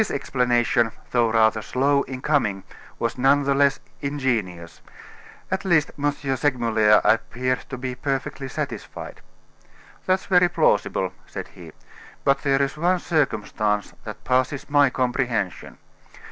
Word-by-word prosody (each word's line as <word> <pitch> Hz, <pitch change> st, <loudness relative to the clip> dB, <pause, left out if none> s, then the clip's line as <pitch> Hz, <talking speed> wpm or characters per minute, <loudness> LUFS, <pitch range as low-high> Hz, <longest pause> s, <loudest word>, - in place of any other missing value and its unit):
This 215 Hz, -, -1 dB
explanation, 120 Hz, -4 st, +1 dB, 0.2 s
though 120 Hz, -2 st, +2 dB
rather 110 Hz, -1 st, +3 dB
slow 140 Hz, +5 st, +1 dB
in 130 Hz, -1 st, -7 dB
coming, 105 Hz, -11 st, +1 dB, 0.3 s
was 115 Hz, +1 st, -3 dB
none 140 Hz, +2 st, +4 dB
the 140 Hz, 0 st, +1 dB
less 140 Hz, 0 st, +3 dB, 0.2 s
ingenious. 115 Hz, -12 st, -3 dB, 0.7 s
At 190 Hz, +1 st, -1 dB
least, 170 Hz, -6 st, +2 dB
M. 145 Hz, 0 st, 0 dB
Segmuller 120 Hz, -7 st, +2 dB
appeared 125 Hz, +3 st, +1 dB
to 135 Hz, -, -5 dB
be 130 Hz, 0 st, -4 dB
perfectly 135 Hz, +1 st, -3 dB
satisfied. 130 Hz, -, -6 dB, 0.9 s
"That's 185 Hz, 0 st, +1 dB
very 180 Hz, -1 st, +4 dB
plausible," -, -, +1 dB
said -, -, -7 dB
he; -, -, -13 dB, 0.5 s
"but 140 Hz, 0 st, +3 dB
there 140 Hz, -1 st, +2 dB
is 140 Hz, -, -3 dB
one 175 Hz, +4 st, +2 dB
circumstance 105 Hz, -, -1 dB
that 105 Hz, -2 st, -9 dB
passes 130 Hz, +3 st, 0 dB
my 145 Hz, -1 st, +5 dB
comprehension. 125 Hz, -, -2 dB
130 Hz, 130 wpm, -23 LUFS, 115-145 Hz, 0.9 s, my